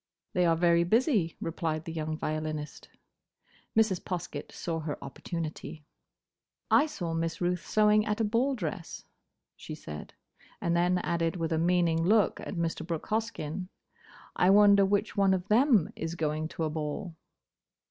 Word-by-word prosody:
"They 180 -1 +3
are 165 - +4
very 170 0 +3
busy," 215 - +2
replied 160 -1 -3
the 165 - -5
young 155 -1 -3
violinist. 155 -1 -4 0.9
Mrs. 215 -5 +3
Poskett 170 -5 -5
saw 165 -2 -3
her 155 -2 -4
opportunity. 155 +2 -6 0.9
"I 300 - +5
saw 170 - -4
Miss 165 0 -2
Ruth 180 -1 -1
sewing 215 0 +4
at 210 +1 -1
a - - +2
ball 240 +6 +1
dress," 170 -5 -5 0.5
she - - -8
said; 75 0 -9 0.4
and 170 0 0
then 175 +1 +3
added 170 -1 -1
with 165 -2 -2
a 160 - +1
meaning 170 -1 +2
look 210 +3 +3
at - - -6
Mr. 165 -1 -2
Brooke 165 -2 -5
Hoskyn, 195 -6 -2 0.7
"I 180 - +3
wonder 200 0 +7
which 205 +2 0
of 190 -2 +2
them 225 - +4
is 165 +1 -4
going 155 -1 -1
to 165 - -5
a 155 - 0
ball?" 155 +3 -4
170 Hz, 150 wpm, -29 LUFS, 160-200 Hz, 0.9 s, wonder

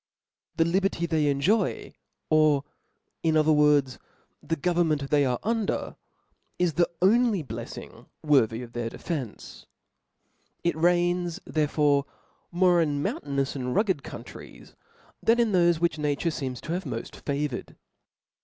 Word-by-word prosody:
Thef 165 - +4
liberty 190 -2 +1
they 160 -3 +1
enjoy, 145 +11 0 0.4
or 155 -2 +4 0.6
in 160 -1 +2
other 155 0 +4
words, 150 -3 +3 0.4
the 160 +2 -2
govern 175 +2 +1
ment 145 -3 -1
they 145 -1 +4
are 125 -2 0
under, 225 -1 -1 0.6
is 175 -2 +1
the 175 +3 +2
only 220 -2 +3
bleffing 115 -2 -9 0.2
worthy 125 -6 +2
of 120 -1 -12
their 120 -1 -3
defence. 135 - -6 1.0
It 170 - +1
reigns 175 +1 +1
therefore 145 -2 +1 0.5
more 175 -1 +4
in 145 -3 0
moun - - -2
tainous 140 -1 -2
add 125 -2 -3
rugged 195 -8 +1
countries, - - -11 0.5
than 230 +1 +3
in 230 -2 +2
thofe 175 -3 +3
which 170 -2 0
nature 150 +3 0
feems 130 -5 -4
to 160 - -6
have 180 +2 -2
moft 115 -4 -5
favoured. 140 -2 -4
155 Hz, 135 wpm, -26 LUFS, 140-175 Hz, 1.0 s, Thef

